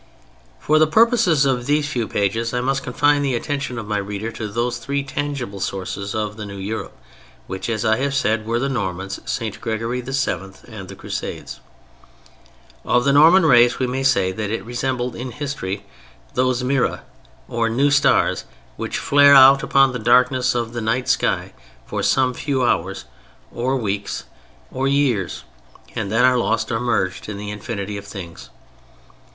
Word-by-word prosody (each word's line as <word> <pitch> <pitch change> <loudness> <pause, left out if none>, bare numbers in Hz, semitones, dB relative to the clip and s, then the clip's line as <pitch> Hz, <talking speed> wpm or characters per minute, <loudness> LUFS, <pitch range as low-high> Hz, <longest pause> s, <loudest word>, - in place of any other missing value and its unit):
For 155 +1 +2
the 155 - +5
purposes 215 - +4
of 125 -3 0
these 145 0 +2
few 120 -7 -2
pages 115 +4 -1
I 125 - 0
must 135 +2 0
confine 145 +3 +2
the 135 -3 0
attention 140 0 -3
of 115 - -5
my 105 -1 -1
reader 100 +3 -4
to 110 -1 -5
those 120 +3 -2
three 140 +4 -2
tangible 140 -7 -4
sources 100 +1 -4
of 105 -1 -3
the 105 - -6
new 100 0 -8
Europe, 105 +3 -5 0.5
which, 95 - -5
as 115 0 -1
I 110 0 +3
have 140 +2 -1
said, 110 -5 0
were 115 +1 0
the 135 +3 0
Normans, 95 -7 -3
St. 110 -3 -4
Gregory 115 +2 -2
VII., 130 -7 -2
and 105 -5 -9
the - - -9
Crusades. - - -6 1.2
Of 120 0 +2
the 140 - +3
Norman 165 +5 +6
race 120 -4 +5
we 130 - 0
may 130 +2 -2
say 100 -9 +2
that 105 +2 -4
it 115 +1 -3
resembled 125 +1 -2
in 125 +2 -5
history 100 -9 -4 0.5
those 130 0 +1
miræ 135 0 0 0.5
or 115 -1 0
new 135 +5 +2
stars 140 -1 +3 0.3
which - - -3
flare 145 0 +6
out 135 0 +8
upon 135 -1 +3
the 125 - -3
darkness 125 +2 +3
of 120 -1 -2
the 120 - -3
night 120 +3 -1
sky - - 0 0.3
for - - -4
some 130 -1 +2
few 135 -1 -1
hours 95 -5 0 0.5
or 130 +3 -1
weeks 100 -3 -3 0.5
or 135 +1 -1
years, 135 -9 0 0.5
and 100 - -3
then 115 +3 +4
are 130 -1 +4
lost 115 -1 0
or 115 - 0
merged 100 -6 -1
in 105 - -5
the 105 0 -6
infinity 105 -1 -5
of 100 0 -9
things. 90 -6 -9
120 Hz, 170 wpm, -21 LUFS, 105-135 Hz, 1.2 s, out